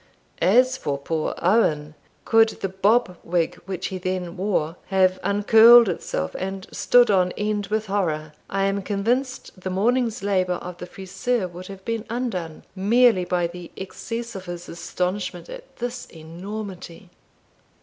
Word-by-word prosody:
As 255 Hz, +6 st, +4 dB
for 145 Hz, -, -2 dB
poor 155 Hz, +3 st, -2 dB
Owen, 155 Hz, -7 st, +2 dB, 0.3 s
could 225 Hz, 0 st, +5 dB
the 195 Hz, -, -1 dB
bob 195 Hz, 0 st, +2 dB
wig 170 Hz, -1 st, 0 dB
which 190 Hz, -2 st, -3 dB
he 185 Hz, -, -5 dB
then 180 Hz, -1 st, -3 dB
wore 180 Hz, -5 st, -1 dB
have 185 Hz, -1 st, +2 dB
uncurled 225 Hz, +3 st, +7 dB
itself, 80 Hz, -, -3 dB
and 190 Hz, 0 st, -4 dB
stood 245 Hz, -3 st, +4 dB
on 180 Hz, -2 st, +3 dB
end 210 Hz, -1 st, -2 dB
with 215 Hz, +2 st, -1 dB
horror, 160 Hz, -7 st, -2 dB, 0.2 s
I 195 Hz, 0 st, 0 dB
am 195 Hz, 0 st, 0 dB
convinced 225 Hz, +2 st, -2 dB
the 185 Hz, -, -3 dB
morning's 230 Hz, +4 st, 0 dB
labour 185 Hz, -3 st, +1 dB
of 175 Hz, 0 st, -8 dB
the 180 Hz, -, -7 dB
friseur 195 Hz, +3 st, -2 dB
would 180 Hz, +1 st, -9 dB
have 195 Hz, -1 st, -11 dB
been 230 Hz, -1 st, -2 dB
undone, 200 Hz, -10 st, -4 dB
merely 210 Hz, 0 st, +4 dB
by 175 Hz, 0 st, 0 dB
the 175 Hz, 0 st, -7 dB
excess 230 Hz, +4 st, -6 dB
of 190 Hz, -2 st, -8 dB
his 175 Hz, -1 st, -7 dB
astonishment 180 Hz, -, -4 dB
at -, -, -11 dB
this 245 Hz, +1 st, -5 dB
enormity. 180 Hz, +2 st, -8 dB
195 Hz, 150 wpm, -23 LUFS, 180-225 Hz, 0.3 s, uncurled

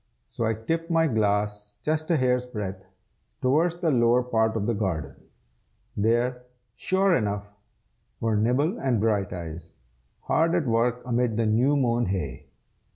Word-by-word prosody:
So 115 Hz, -, -4 dB
I 110 Hz, 0 st, +1 dB
tipped 165 Hz, +10 st, -3 dB
my 165 Hz, -1 st, +3 dB
glass 105 Hz, -4 st, -1 dB
just 155 Hz, +1 st, -1 dB
a 165 Hz, -, +3 dB
hair's 125 Hz, -1 st, +1 dB
breadth, 100 Hz, -5 st, -5 dB, 0.6 s
towards 160 Hz, +7 st, +2 dB
the 170 Hz, -2 st, 0 dB
lower 120 Hz, -1 st, +3 dB
part 110 Hz, -2 st, +1 dB
of 100 Hz, -, -2 dB
the 120 Hz, -, +1 dB
garden. 85 Hz, -10 st, -2 dB, 0.8 s
There, 120 Hz, +4 st, +1 dB, 0.3 s
sure 190 Hz, +4 st, +2 dB
enough, 105 Hz, -2 st, -2 dB, 0.7 s
were 115 Hz, -1 st, 0 dB
Nibble 130 Hz, -, +1 dB
and 125 Hz, -5 st, +1 dB
Brighteyes, 90 Hz, -6 st, -2 dB, 0.5 s
hard 165 Hz, +1 st, +1 dB
at 170 Hz, -4 st, +1 dB
work 120 Hz, +1 st, +1 dB
amid 120 Hz, -2 st, 0 dB
the 115 Hz, -, +1 dB
new 120 Hz, +7 st, +3 dB
mown 120 Hz, -4 st, +1 dB
hay. 90 Hz, -9 st, -4 dB
115 Hz, 145 wpm, -26 LUFS, 105-135 Hz, 0.8 s, my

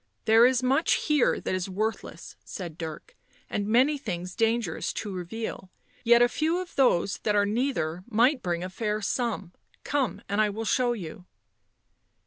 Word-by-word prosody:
" -, -, -47 dB
There 225 Hz, +2 st, +7 dB
is 255 Hz, -1 st, +1 dB
much 270 Hz, +6 st, +3 dB
here 300 Hz, -5 st, +2 dB
that -, -, -3 dB
is 185 Hz, 0 st, -2 dB
worthless," 215 Hz, +4 st, -4 dB
said 175 Hz, -6 st, -7 dB
Dirk, 160 Hz, -, -8 dB, 0.2 s
" -, -, -33 dB
and 205 Hz, 0 st, -1 dB
many 260 Hz, +7 st, +3 dB
things 180 Hz, -6 st, -5 dB
dangerous 225 Hz, -6 st, 0 dB
to 205 Hz, -3 st, -5 dB
reveal, 190 Hz, +2 st, -5 dB, 0.3 s
yet 235 Hz, 0 st, +6 dB
a -, -, +5 dB
few 315 Hz, +7 st, 0 dB
of 365 Hz, -1 st, -6 dB
those 200 Hz, -8 st, +2 dB
that 210 Hz, -, 0 dB
are 205 Hz, 0 st, +4 dB
neither 205 Hz, -, -1 dB
might 245 Hz, +4 st, +3 dB
bring 175 Hz, -1 st, -2 dB
a 185 Hz, -, -4 dB
fair 210 Hz, +1 st, -2 dB
sum 210 Hz, -6 st, -2 dB
— -, -, -36 dB
come, 275 Hz, -5 st, 0 dB
and 205 Hz, +2 st, +1 dB
I 215 Hz, -, +3 dB
will 220 Hz, +2 st, -4 dB
show 245 Hz, +2 st, +2 dB
you." 180 Hz, -3 st, -8 dB
220 Hz, 180 wpm, -27 LUFS, 185-245 Hz, 0.3 s, There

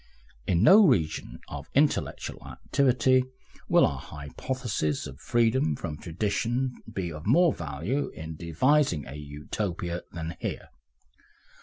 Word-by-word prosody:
In 90 Hz, +1 st, +2 dB
no 200 Hz, -, +8 dB
region 85 Hz, -, 0 dB
of 75 Hz, +1 st, -8 dB
intellectual 145 Hz, +2 st, 0 dB
activity 130 Hz, -1 st, +2 dB, 0.5 s
will -, -, +6 dB
our -, -, -2 dB
hypothesis 80 Hz, -, -3 dB
of -, -, -9 dB
freedom 115 Hz, -, +2 dB
from 75 Hz, +1 st, -5 dB
tradition 115 Hz, -, -1 dB, 0.2 s
be 95 Hz, -5 st, -3 dB
of 75 Hz, +3 st, -8 dB
more 170 Hz, +7 st, +5 dB
value 85 Hz, -, -3 dB
in 80 Hz, 0 st, -8 dB
devising 85 Hz, -, +2 dB
a 65 Hz, -, -8 dB
Utopia 85 Hz, +4 st, -4 dB
than 80 Hz, -1 st, -5 dB
here. -, -, -5 dB
90 Hz, 120 wpm, -27 LUFS, 80-130 Hz, 0.5 s, no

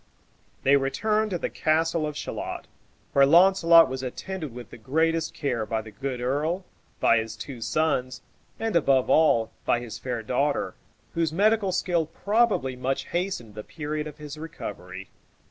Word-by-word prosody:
They 140 Hz, +1 st, +5 dB
returned 210 Hz, +11 st, 0 dB
to 180 Hz, -, -1 dB
the -, -, -3 dB
castle 160 Hz, 0 st, +1 dB
of 150 Hz, -1 st, -6 dB
Shalott, -, -, -5 dB, 0.5 s
where 140 Hz, -, +6 dB
Launcelot 170 Hz, +2 st, +7 dB
was 130 Hz, 0 st, -4 dB
attended 155 Hz, +4 st, -5 dB
with 120 Hz, +1 st, -10 dB
the -, -, -10 dB
greatest 160 Hz, +6 st, 0 dB
care 125 Hz, -6 st, -1 dB
by 110 Hz, 0 st, -2 dB
the 110 Hz, -, -11 dB
good 135 Hz, +1 st, -4 dB
earl, 150 Hz, +9 st, -1 dB, 0.3 s
by -, -, +4 dB
his 110 Hz, 0 st, -5 dB
two 125 Hz, +1 st, -8 dB
sons, 130 Hz, -1 st, -1 dB, 0.4 s
and, 225 Hz, -3 st, -2 dB
above 135 Hz, -5 st, +3 dB
all, 115 Hz, -8 st, +4 dB
by 120 Hz, -, +2 dB
his 120 Hz, -1 st, -7 dB
fair 120 Hz, -3 st, -4 dB
daughter, 140 Hz, +6 st, 0 dB, 0.4 s
whose 165 Hz, -2 st, 0 dB
medical 205 Hz, +3 st, +2 dB
skill 175 Hz, -3 st, 0 dB
probably 200 Hz, -, +1 dB
much 130 Hz, +2 st, -2 dB
hastened 175 Hz, -, -3 dB
the 105 Hz, 0 st, -7 dB
period 150 Hz, -1 st, -4 dB
of 150 Hz, -, -10 dB
his 150 Hz, 0 st, -8 dB
recovery. 95 Hz, -, -8 dB
150 Hz, 160 wpm, -26 LUFS, 125-170 Hz, 0.5 s, Launcelot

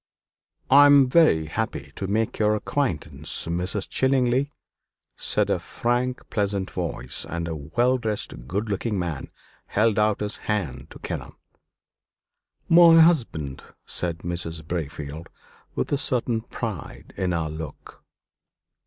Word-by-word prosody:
"I 145 Hz, +2 st, +9 dB
am 140 Hz, -2 st, +7 dB
very 125 Hz, -, +4 dB
happy 75 Hz, -, -4 dB
to 95 Hz, -, -3 dB
make 110 Hz, +3 st, -1 dB
your 105 Hz, 0 st, +3 dB
acquaintance, 75 Hz, -, -2 dB
Mr. 90 Hz, +4 st, -2 dB
Chillingly," 130 Hz, +1 st, +2 dB, 0.7 s
said -, -, +1 dB
a -, -, +1 dB
frank, 125 Hz, +2 st, -2 dB
pleasant 100 Hz, -3 st, -1 dB
voice; 80 Hz, -8 st, -3 dB
and 85 Hz, -1 st, -4 dB
a 80 Hz, -, -3 dB
well 120 Hz, -, +1 dB
dressed, 105 Hz, -, -4 dB
good 100 Hz, -, -2 dB
looking 105 Hz, +1 st, -1 dB
man 85 Hz, -6 st, -3 dB, 0.4 s
held 110 Hz, 0 st, +2 dB
out 105 Hz, -1 st, +2 dB
his 105 Hz, 0 st, -3 dB
hand 75 Hz, -, -3 dB
to -, -, -11 dB
Kenelm. -, -, -6 dB, 1.3 s
"My 165 Hz, -1 st, +8 dB
husband," 115 Hz, -, +2 dB, 0.2 s
said 85 Hz, -2 st, -2 dB
Mrs. 85 Hz, -2 st, -3 dB
Braefield 75 Hz, -1 st, -5 dB, 0.5 s
with -, -, -2 dB
a 140 Hz, -, +1 dB
certain 120 Hz, -4 st, 0 dB
pride 110 Hz, -, -7 dB
in 95 Hz, -1 st, -1 dB
her 85 Hz, -2 st, -1 dB
look. 80 Hz, 0 st, -9 dB
100 Hz, 125 wpm, -25 LUFS, 80-120 Hz, 1.3 s, I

